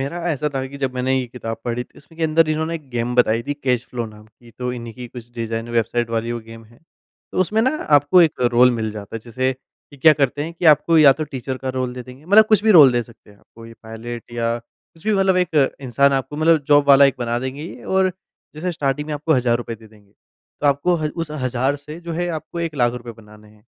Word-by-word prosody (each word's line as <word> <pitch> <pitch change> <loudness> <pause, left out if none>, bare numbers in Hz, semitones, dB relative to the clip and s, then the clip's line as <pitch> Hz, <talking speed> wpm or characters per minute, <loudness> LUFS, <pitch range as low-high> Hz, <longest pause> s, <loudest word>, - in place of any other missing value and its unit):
मेरा 140 +6 -4
ऐसा 150 0 -1
तो 135 - -4
है 130 0 -4
कि 140 - -10
जब 130 -1 -1
मैंने 130 +1 0
ये 130 - -3
किताब 115 -2 -6
पढ़ी 120 0 -2
थी - - -32
इसमें 160 +3 -18
के 165 - 0
अंदर 160 0 +3
इन्होंने 160 +2 -1 0.2
गेम 120 +1 -1
बताई 115 -2 +3
थी 145 - -1
कैश 125 -4 -1
फ्लो 120 -2 -3
नाम 105 0 -14
की, 120 +2 -20
तो 125 +2 -4
इन्ही 115 -2 -7
की 125 +1 -9
कुछ 120 -1 -11
डिज़ाइन 115 0 -4
वेबसाइट 120 0 0
वाली 115 +1 -2
वो 120 - -4
गेम 115 0 -12
है। 115 +2 -22 0.6
उसमें 215 +5 0
ना 260 +5 +1 0.2
आपको 170 +6 +4
एक 160 - 0
रोल 125 +1 +6
मिल 110 -1 -2
जाता 105 +1 -7
है - - -8
जैसे 130 +3 -1 0.4
कि 145 - -14
क्या 155 +3 +6
करते 140 +1 +1
हैं 165 - -6
कि 170 - -7
आपको 160 +2 +2
या 145 -3 +8
तो 155 - 0
टीचर 130 0 -4
का - - -1
रोल 130 -1 -2
दे 125 - -6
देंगे 125 +4 -14
मतलब 205 +5 +6
कुछ 210 -1 +5
भी 220 - +4
रोल 140 -5 +8
दे 120 0 +1
सकते 115 -2 -19
हैं 100 - -21
कोई 115 0 -12
पायलट 115 +1 -8
या 115 0 -1
कुछ 160 +7 -24
भी 215 - +2
मतलब 195 -1 +2
एक 180 -3 0 0.3
इंसान 140 +4 +3
आपको 135 +2 -2
मतलब 155 -1 +3
जॉब 145 0 +4
वाला 140 0 +8
एक 135 - +3
बना 120 -1 -1
देंगे 130 +4 -5
ये 170 - -10
और 190 -1 +3 0.4
जैसा 170 +4 -3
स्टार्टिंग 150 -2 -2
में 150 - -2
आपको 150 +2 0
हज़ार 120 -2 +2
रुपए 115 -1 -5
दे 110 0 -16
देंगे 105 -2 -23 0.5
तो 145 - 0
आपको 145 +5 +2
हज़ 155 -2 -2
उस 155 - -16
हज़ार 130 -1 -1
से 150 +3 -10
जो 170 -1 -6
है 175 +2 -2
आपको 170 +2 -8
1 165 -2 -3
लाख 120 -3 +2
रुपए 120 -1 -8
बनाने 105 0 -17
हैं। 105 0 -23
130 Hz, 250 wpm, -20 LUFS, 115-155 Hz, 0.6 s, या